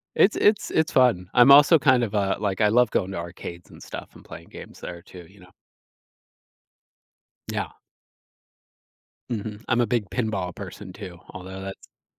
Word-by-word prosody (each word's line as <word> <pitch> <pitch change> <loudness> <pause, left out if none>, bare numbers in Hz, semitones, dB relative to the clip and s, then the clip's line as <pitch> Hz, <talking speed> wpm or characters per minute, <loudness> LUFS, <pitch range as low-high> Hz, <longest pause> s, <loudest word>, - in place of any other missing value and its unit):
It's 205 - +4
it's 210 -1 +2
it's 160 0 +1
fun. 115 -9 +3
I'm 125 +2 +7
also 145 +4 +8
kind 130 -4 +3
of, 110 -2 -3
uh, 100 -1 0
like 100 -1 -2
I 105 - +4
love 120 +1 +3
going 95 -1 -1
to - - -5
arcades 85 0 -8
and - - -14
stuff - - -9
and - - -15
playing - - -12
games - - -12
there 85 - -8
too, 90 0 -13
you 100 +1 -20
know. 90 0 -18 2.0
Yeah. - - -3 1.6
Mhm, 110 -1 -5
I'm 120 -1 +2
a 120 - +1
big 115 -6 -1
pinball 95 -5 -2
person 95 0 -9
too, 95 -3 -9
although 95 +1 -9
that's 95 0 -11
105 Hz, 165 wpm, -24 LUFS, 95-120 Hz, 2.0 s, also